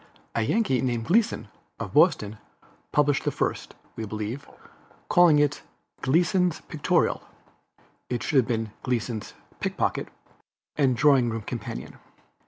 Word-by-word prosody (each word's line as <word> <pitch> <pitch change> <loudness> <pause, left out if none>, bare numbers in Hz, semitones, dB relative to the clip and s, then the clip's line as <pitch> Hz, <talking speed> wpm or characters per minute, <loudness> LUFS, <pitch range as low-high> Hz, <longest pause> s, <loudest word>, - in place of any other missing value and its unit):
A 115 - 0
Yankee 130 - +1
named 120 -3 -1
Gleason, 210 - +2 0.3
of - - -5
Boston, 105 +1 +3 0.5
published 145 -1 +2
the - - +1
first, - - -2 0.2
we 110 - -5
believe, 110 +5 -5 0.6
calling 175 -4 +6
it 145 0 +2 0.4
Gleason's 175 +4 +2
Pictorial 155 -5 0 0.9
(it 120 - -2
should 150 - +1
have 125 - +4
been 115 -3 -1
Gleason's 120 -3 -3 0.2
Pickpocket) - - -1 0.7
and 130 -5 +2
Drawing 135 -3 +5
Room 115 -1 -4
Companion. - - -6
130 Hz, 120 wpm, -26 LUFS, 115-150 Hz, 0.9 s, calling